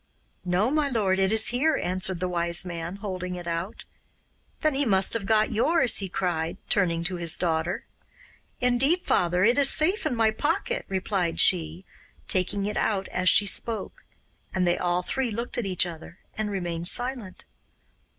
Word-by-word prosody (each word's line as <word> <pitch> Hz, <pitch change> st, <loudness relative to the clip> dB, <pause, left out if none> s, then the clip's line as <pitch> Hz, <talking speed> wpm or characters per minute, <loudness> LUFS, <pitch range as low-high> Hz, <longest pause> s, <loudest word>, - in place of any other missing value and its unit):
'No, 185 Hz, +7 st, 0 dB
my 300 Hz, -1 st, +1 dB
lord, 200 Hz, -6 st, 0 dB
it 190 Hz, +1 st, +2 dB
is 220 Hz, +1 st, +4 dB
here,' 280 Hz, +6 st, +1 dB
answered 185 Hz, 0 st, -1 dB
the 185 Hz, -, -2 dB
Wise 170 Hz, 0 st, 0 dB
Man, 170 Hz, 0 st, -6 dB
holding 185 Hz, -3 st, -5 dB
it 175 Hz, -1 st, -8 dB
out. 170 Hz, +4 st, -5 dB, 0.8 s
'Then 310 Hz, -2 st, +1 dB
he 275 Hz, +2 st, 0 dB
must 195 Hz, -6 st, +3 dB
have 215 Hz, -4 st, 0 dB
got 215 Hz, 0 st, +2 dB
yours,' 250 Hz, +4 st, +4 dB
he 195 Hz, -2 st, 0 dB
cried, 170 Hz, -3 st, -2 dB
turning 170 Hz, -5 st, +1 dB
to 180 Hz, +1 st, -2 dB
his 170 Hz, -1 st, +2 dB
daughter. 165 Hz, 0 st, -2 dB, 0.7 s
'Indeed, 265 Hz, +8 st, +1 dB
father, 180 Hz, +1 st, +1 dB
it 240 Hz, +6 st, +3 dB
is 275 Hz, -1 st, +6 dB
safe 360 Hz, +3 st, +2 dB
in 265 Hz, -, -2 dB
my 225 Hz, -1 st, +2 dB
pocket,' 295 Hz, +9 st, -2 dB
replied 190 Hz, -2 st, -2 dB
she, 170 Hz, 0 st, +2 dB, 0.4 s
taking 195 Hz, +2 st, 0 dB
it 210 Hz, -, -3 dB
out 195 Hz, -3 st, -1 dB
as 185 Hz, 0 st, +1 dB
she 205 Hz, -, +5 dB
spoke; 225 Hz, +3 st, -2 dB, 0.5 s
and 185 Hz, -1 st, +1 dB
they 175 Hz, 0 st, +2 dB
all 180 Hz, 0 st, -1 dB
three 265 Hz, +6 st, -2 dB
looked 235 Hz, +3 st, -4 dB
at 225 Hz, -, -3 dB
each 185 Hz, -1 st, +1 dB
other 170 Hz, 0 st, -10 dB, 0.2 s
and 215 Hz, -1 st, -2 dB
remained 175 Hz, -4 st, -3 dB
silent. 245 Hz, -3 st, -2 dB
190 Hz, 170 wpm, -25 LUFS, 175-230 Hz, 0.8 s, is